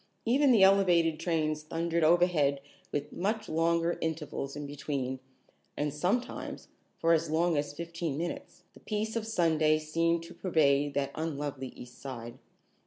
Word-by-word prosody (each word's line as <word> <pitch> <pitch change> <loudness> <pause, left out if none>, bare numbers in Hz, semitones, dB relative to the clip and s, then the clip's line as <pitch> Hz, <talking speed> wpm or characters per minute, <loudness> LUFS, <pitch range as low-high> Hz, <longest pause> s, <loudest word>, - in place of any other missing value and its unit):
Even 265 +4 +4
the 220 -5 +6
elevated 175 -5 +4
trains 155 -3 0
thundered 165 +1 -1
overhead 155 -4 +3 0.3
with 145 0 -3
much 215 +4 -1
longer 165 +1 +1
intervals 150 -3 -3
in 145 0 -5
between, 140 -2 -3 0.6
and 145 -1 -1
sometimes, 190 +11 -2 0.3
for 165 0 +3
as 165 0 +1
long 165 +2 +2
as 145 0 -1
fifteen 170 -1 -4
minutes, 175 +2 -5
the - - -16
peace 215 +1 -3
of 225 -1 -2
Sunday 160 -7 +3
seemed 165 +2 0
to 165 - -11
pervade 145 -5 +2
that 140 -1 0
unlovely 145 -4 -3
East 125 0 -12
Side. 120 -3 -7
160 Hz, 145 wpm, -30 LUFS, 145-175 Hz, 0.6 s, the